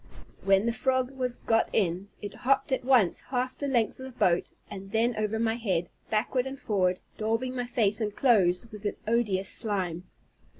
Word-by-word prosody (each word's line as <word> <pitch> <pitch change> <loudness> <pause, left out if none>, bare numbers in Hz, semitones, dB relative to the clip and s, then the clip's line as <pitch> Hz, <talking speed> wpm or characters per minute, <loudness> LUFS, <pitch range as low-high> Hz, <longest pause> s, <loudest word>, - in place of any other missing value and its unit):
When 195 +1 +4
the 235 - +1
frog 260 +2 0
was 255 -2 -1
got 225 -2 +1
in, 185 -1 0 0.2
it 205 - -5
hopped 270 +2 +1
at 260 - 0
once 245 -8 +3
half 255 0 -3
the 285 - -2
length 240 -4 0
of 260 - -7
the - - -9
boat, 175 -1 +2 0.2
and 195 0 -9
then 230 +2 +1
over 215 +1 -1
my 225 0 +1
head, 190 -7 -2 0.2
backward 245 +4 0
and 270 0 -7
forward, 185 -4 0 0.2
daubing 225 +4 -1
my 245 -1 -2
face 220 -3 +2
and 210 -1 -2
clothes 195 -7 +3
with 210 -1 -10
its 205 - -3
odious 210 -5 +1
slime. 185 -6 -1
225 Hz, 185 wpm, -28 LUFS, 195-250 Hz, 0.2 s, When